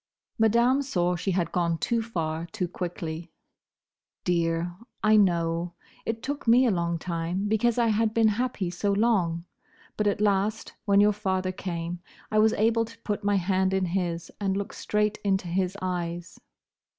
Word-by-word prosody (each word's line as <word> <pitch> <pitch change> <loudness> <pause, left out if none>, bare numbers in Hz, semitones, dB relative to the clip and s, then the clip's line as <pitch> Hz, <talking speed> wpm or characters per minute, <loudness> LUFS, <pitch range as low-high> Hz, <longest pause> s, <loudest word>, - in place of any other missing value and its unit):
Madame 235 +5 +4
saw 180 -10 0
she 175 - -3
had 175 -3 0
gone 170 -2 +1
too 230 +7 0
far 165 -7 -3
too 185 -2 -3
quickly. 170 -2 -5 0.9
"Dear, 170 0 0 0.3
I 215 0 +5
know. 170 -3 +2 0.3
It 225 0 -2
took 285 -2 -4
me 245 +3 +6
a 240 - +3
long 170 -2 0
time, 170 +3 -2
because 220 +2 +2
I 235 -1 +3
had 220 0 +2
been 225 0 +4
happy 215 -5 -1
so 200 +3 0
long; 190 -6 +1 0.5
but 210 - +1
at 205 - +1
last, 210 +1 0
when 200 -1 +5
your 210 0 +5
father 190 -2 -1
came, 175 -2 -4 0.3
I 215 - +3
was 220 +1 +5
able 225 +2 +2
to 230 0 -10
put 205 -1 -2
my 205 0 +2
hand 190 0 +1
in 190 -1 +1
his, 170 -2 -2
and 195 -1 0
look 200 - -4
straight 210 0 0
into 190 -2 +1
his 185 +2 -1
eyes." 175 -1 -4
190 Hz, 165 wpm, -27 LUFS, 175-215 Hz, 0.9 s, me